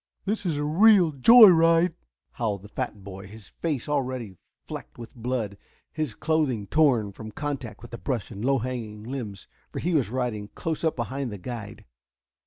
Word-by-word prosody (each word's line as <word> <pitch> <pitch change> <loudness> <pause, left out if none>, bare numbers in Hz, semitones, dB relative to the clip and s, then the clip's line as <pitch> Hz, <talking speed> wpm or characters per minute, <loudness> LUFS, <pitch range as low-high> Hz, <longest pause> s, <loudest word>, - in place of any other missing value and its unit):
"This 205 -1 -2
is 155 -4 0
a 145 - -1
real 180 +2 +5
joy 215 - +9
ride," 165 0 +4 0.4
howled 105 -5 -3
the 105 - -12
fat 105 -5 -5
boy, 95 0 -9
his 105 -1 -12
face 150 -7 -3
already 130 -8 -2 0.3
flecked - - -8
with 115 -1 -10
blood, 115 -4 -3 0.3
his 155 -8 -3
clothing 150 -7 0
torn, 125 -6 +2
from 110 +2 -9
contact 135 -3 -5
with 120 0 -9
brush 125 -7 -2
and 100 +2 -7
low 135 +2 +3
hanging 115 -4 -5
limbs, 110 -6 -6 0.2
for - - -7
he 175 +2 -1
was 140 -9 +2
riding 120 -4 -2
close 160 -1 -3
up 160 - +1
behind 130 +1 -3
the 105 - -6
guide. 110 +1 -8
125 Hz, 175 wpm, -26 LUFS, 110-155 Hz, 0.4 s, joy